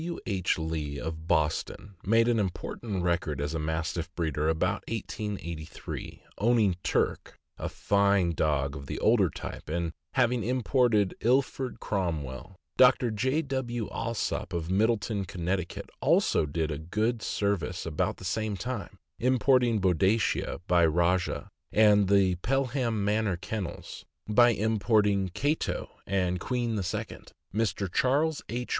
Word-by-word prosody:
W. 170 Hz, +1 st, -4 dB
H. 95 Hz, -4 st, 0 dB
Lee, 80 Hz, -3 st, -3 dB
of 80 Hz, +1 st, -5 dB
Boston, 80 Hz, +5 st, 0 dB
made 115 Hz, +3 st, +4 dB
an 120 Hz, -2 st, +3 dB
important 95 Hz, 0 st, -3 dB
record 85 Hz, -5 st, 0 dB
as 75 Hz, +2 st, -2 dB
a 80 Hz, -, -2 dB
Mastiff 80 Hz, +2 st, -2 dB
breeder 80 Hz, -2 st, 0 dB
about 90 Hz, +6 st, 0 dB
1883, 100 Hz, -8 st, -5 dB, 0.2 s
owning 110 Hz, -4 st, +3 dB
Turk, -, -, -1 dB, 0.2 s
a -, -, -3 dB
fine 100 Hz, -3 st, +2 dB
dog 75 Hz, -3 st, 0 dB
of 70 Hz, -1 st, -8 dB
the -, -, -4 dB
older -, -, +4 dB
type, -, -, -8 dB
and 85 Hz, +1 st, -1 dB, 0.2 s
having 125 Hz, -3 st, +2 dB
imported 120 Hz, -4 st, +2 dB
Ilford 130 Hz, +1 st, +1 dB
Cromwell. 80 Hz, -, -3 dB, 0.2 s
Dr. 125 Hz, -2 st, +5 dB
J. 130 Hz, +9 st, 0 dB
W. 120 Hz, -5 st, -3 dB
Alsop, 115 Hz, -4 st, -2 dB
of 85 Hz, 0 st, -2 dB
Middletown, 105 Hz, 0 st, +1 dB
Conn., 90 Hz, +2 st, -1 dB, 0.4 s
also 75 Hz, -, +3 dB
did 80 Hz, +1 st, -3 dB
good 110 Hz, +4 st, 0 dB
serv 100 Hz, -4 st, 0 dB
ice 85 Hz, +3 st, -5 dB
about 80 Hz, -2 st, -1 dB
the -, -, -10 dB
same 105 Hz, +2 st, -1 dB
time, 125 Hz, -1 st, -5 dB, 0.2 s
importing 125 Hz, -2 st, +3 dB
Boadicea, 95 Hz, +2 st, +1 dB
by 90 Hz, -1 st, +4 dB
Rajah; 85 Hz, +3 st, +1 dB, 0.2 s
and 105 Hz, -2 st, +5 dB
the 95 Hz, -2 st, +3 dB
Pelham 125 Hz, -2 st, 0 dB
Manor 105 Hz, -3 st, +1 dB
Kennels, 100 Hz, 0 st, -6 dB, 0.2 s
by 120 Hz, +3 st, +6 dB
importing 105 Hz, -3 st, +2 dB
Cato 145 Hz, +3 st, -1 dB, 0.2 s
and 90 Hz, -2 st, 0 dB
Queen 120 Hz, +1 st, -1 dB
II. 100 Hz, -5 st, -3 dB, 0.4 s
Mr. 100 Hz, -3 st, -1 dB
Charles 145 Hz, +4 st, +2 dB
H. 120 Hz, +1 st, -3 dB
100 Hz, 130 wpm, -28 LUFS, 85-115 Hz, 0.4 s, by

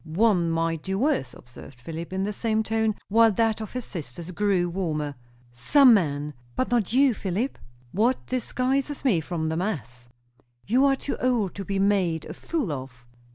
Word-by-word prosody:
"One 175 Hz, +1 st, +2 dB
might 165 Hz, -1 st, 0 dB
do 190 Hz, +2 st, -3 dB
worse," 240 Hz, -, 0 dB
observed 125 Hz, +1 st, -13 dB
Philip, 165 Hz, +6 st, -7 dB
in 190 Hz, +1 st, -1 dB
the 210 Hz, +1 st, -2 dB
same 220 Hz, +1 st, 0 dB
tone, 220 Hz, -1 st, 0 dB
while 225 Hz, +2 st, +5 dB
that 225 Hz, +1 st, +1 dB
of 215 Hz, -, -7 dB
his 250 Hz, -1 st, -3 dB
sister 170 Hz, +1 st, -7 dB
grew 195 Hz, -2 st, +1 dB
warmer. 160 Hz, -5 st, -2 dB, 0.4 s
"Some 250 Hz, -, +6 dB
men, 150 Hz, -6 st, 0 dB, 0.2 s
but 255 Hz, -, -1 dB
not 230 Hz, -6 st, +1 dB
you, 265 Hz, +1 st, +4 dB
Philip?" 205 Hz, +6 st, -3 dB, 0.3 s
"What 235 Hz, +6 st, +1 dB
distinguishes 260 Hz, +3 st, -1 dB
me 195 Hz, -11 st, +3 dB
from 160 Hz, -1 st, -3 dB
the 160 Hz, -, -2 dB
mass?" 125 Hz, -, -4 dB, 0.6 s
"You 250 Hz, +6 st, +3 dB
are 275 Hz, -1 st, +4 dB
too 280 Hz, -, -4 dB
old 240 Hz, -7 st, +1 dB
to 200 Hz, -, -5 dB
be 195 Hz, +1 st, -2 dB
made 195 Hz, -5 st, +1 dB
a -, -, -7 dB
fool 300 Hz, -, -3 dB
of." 130 Hz, -3 st, -7 dB
195 Hz, 175 wpm, -25 LUFS, 160-230 Hz, 0.6 s, Some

